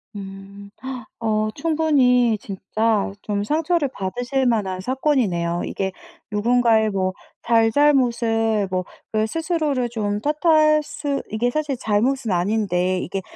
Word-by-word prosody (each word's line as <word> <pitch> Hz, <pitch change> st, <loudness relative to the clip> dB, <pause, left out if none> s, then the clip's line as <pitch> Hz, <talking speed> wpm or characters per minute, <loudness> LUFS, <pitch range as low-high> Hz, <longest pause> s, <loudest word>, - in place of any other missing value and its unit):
음. 195 Hz, 0 st, -9 dB, 0.5 s
어 215 Hz, -1 st, 0 dB
충분히 275 Hz, -7 st, +3 dB
진짜 205 Hz, +2 st, -1 dB
좀 205 Hz, -1 st, -2 dB
상처를 320 Hz, +2 st, +1 dB
받으실 245 Hz, +7 st, -2 dB
만한 195 Hz, -6 st, 0 dB
사건이네요. 205 Hz, -, 0 dB
이게 190 Hz, -1 st, -3 dB, 0.4 s
누군가의 225 Hz, 0 st, +3 dB
뭐 190 Hz, -2 st, -1 dB, 0.3 s
잘잘못을 230 Hz, -3 st, +2 dB
뭐 185 Hz, 0 st, -1 dB, 0.3 s
그 215 Hz, 0 st, +1 dB
스스로를 310 Hz, -4 st, -1 dB
좀 205 Hz, -3 st, -2 dB
탓할 305 Hz, +1 st, +3 dB
수 285 Hz, -1 st, -3 dB
이게 225 Hz, +3 st, 0 dB
사실 295 Hz, 0 st, -2 dB
잘못은 230 Hz, +2 st, 0 dB
아닌데 185 Hz, -1 st, +1 dB
이게 190 Hz, +2 st, -4 dB
225 Hz, 245 characters per minute, -22 LUFS, 200-275 Hz, 0.5 s, 충분히